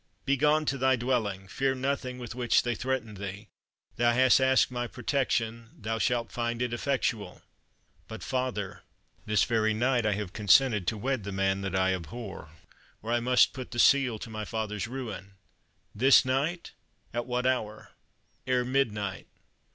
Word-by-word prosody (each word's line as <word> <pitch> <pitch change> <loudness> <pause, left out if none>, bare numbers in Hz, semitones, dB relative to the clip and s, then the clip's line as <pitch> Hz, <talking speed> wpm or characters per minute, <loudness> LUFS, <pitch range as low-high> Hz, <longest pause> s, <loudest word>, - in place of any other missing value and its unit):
Begone 150 +3 +2
to 135 -1 -1
thy 130 0 +4
dwelling. 115 -6 -1
Fear 135 +6 0
nothing 130 -1 -2
with 120 -2 -7
which 120 -1 +2
they 120 - 0
threaten 125 -2 -3
thee. 100 +1 -7 0.5
Thou 120 0 +3
hast 130 +2 +5
asked 130 -1 +3
my 120 -1 -3
protection 115 -3 -1
thou 115 +1 -3
shalt 120 0 0
find 120 -1 -2
it 125 -1 -1
effectual." 120 -4 -2 0.6
"But, 110 - -8
father, 125 -7 -3 0.5
this 105 -2 +3
very 110 -2 +1
night 120 0 +1
I 105 - +2
have 100 -2 -4
consented 105 -1 +4
to 110 - 0
wed 130 +1 -2
the 100 - -5
man 95 0 0
that 95 -1 -3
I 95 0 +2
abhor, 95 0 -7 0.5
or 115 - -4
I 120 - +3
must 125 +1 +4
put 130 -1 -7
the 120 - -8
seal 130 -2 +4
to 110 - -8
my 110 0 -4
father's 105 -2 -3
ruin." 115 -6 -7 0.6
"This 130 +5 +5
night? 145 +7 -1 0.4
at 120 +1 -3
what 125 0 -1
hour?" 110 -5 -2 0.6
"Ere 125 -1 +1
midnight." 110 -7 -1
120 Hz, 160 wpm, -28 LUFS, 105-130 Hz, 0.6 s, hast